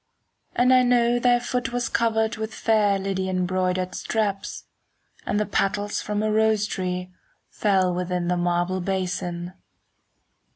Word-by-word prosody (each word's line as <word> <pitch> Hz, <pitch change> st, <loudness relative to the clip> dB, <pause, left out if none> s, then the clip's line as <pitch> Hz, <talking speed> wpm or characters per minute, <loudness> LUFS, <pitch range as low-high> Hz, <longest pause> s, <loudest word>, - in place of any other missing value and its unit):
And 250 Hz, +1 st, +4 dB
I 255 Hz, -, +6 dB
know 245 Hz, -1 st, +3 dB
thy 245 Hz, 0 st, +4 dB
foot 245 Hz, 0 st, -2 dB
was 245 Hz, 0 st, -1 dB
covered 220 Hz, -1 st, +1 dB
5 -, -, -7 dB
With 220 Hz, 0 st, -4 dB
fair 210 Hz, -3 st, +2 dB
Lydian 190 Hz, -1 st, -1 dB
broidered 185 Hz, 0 st, -1 dB
straps; 205 Hz, -3 st, -2 dB, 0.6 s
And 205 Hz, -, +1 dB
the 210 Hz, -, +1 dB
petals 205 Hz, +1 st, -1 dB
from 210 Hz, 0 st, -2 dB
a 215 Hz, -, +1 dB
rose 220 Hz, -1 st, +3 dB
tree 180 Hz, -2 st, -4 dB, 0.4 s
Fell 190 Hz, -3 st, +2 dB
within 180 Hz, 0 st, -2 dB
the 180 Hz, -, +1 dB
marble 175 Hz, +1 st, 0 dB
basin. 180 Hz, -1 st, -3 dB
195 Hz, 140 wpm, -24 LUFS, 180-220 Hz, 0.6 s, I